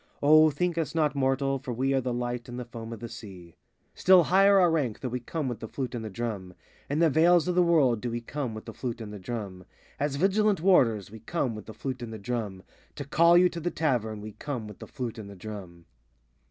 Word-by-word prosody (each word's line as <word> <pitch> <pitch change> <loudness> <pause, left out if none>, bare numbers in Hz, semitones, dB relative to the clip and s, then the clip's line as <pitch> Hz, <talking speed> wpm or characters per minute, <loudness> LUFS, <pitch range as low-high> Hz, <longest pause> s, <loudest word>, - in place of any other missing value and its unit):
O 155 +2 +7
think 170 +3 -1
us 165 0 -3
not 155 -2 +2
mortal, 135 0 0
for 130 -2 -5
we 135 +3 0
Are 135 - +2
the 125 0 -2
light 120 0 -3
on 120 - -6
the 125 - -5
foam 115 -1 -8
of 115 - -8
the 120 - -5
sea. 95 -8 -11 0.4
Still 185 -1 +6
higher 195 +4 +5
our 175 -2 +4
rank, 140 -9 -1
though 130 - -4
we 125 +1 -3
come 145 +4 -4
With 120 -3 -4
the 115 - -6
flute 130 +1 -4
and 120 -2 -4
the 110 - -5
drum. 100 -4 -5 0.3
In 145 - -1
the 165 0 +4
veils 170 +3 +4
of 180 - +1
the 180 - +4
world 145 -10 +3
do 125 - -2
we 120 0 -3
come 125 -1 -4
With 110 - -8
the - - -8
flute 120 -2 -5
and 105 -2 -7
the 105 - -7
drum. 100 -3 -6 0.4
As 145 -1 -1
vigilant 200 +4 +2
warders 115 - +3
we 110 - -10
come 125 +1 -2
With 105 -2 -9
the 110 - -9
flute 130 -2 -5
and 120 -2 -6
the 110 - -6
drum. 105 -3 -4 0.3
To 145 - -6
call 170 +5 +5
you 180 +1 +6
to 170 - -6
the 170 +2 -1
Tavern 120 -11 -1
we 105 +1 -7
come 125 -1 -5
With 105 - -11
the - - -9
flute 120 -4 -5
and 100 -2 -8
the 100 - -10
drum. 90 -4 -9
125 Hz, 250 wpm, -28 LUFS, 110-155 Hz, 0.4 s, O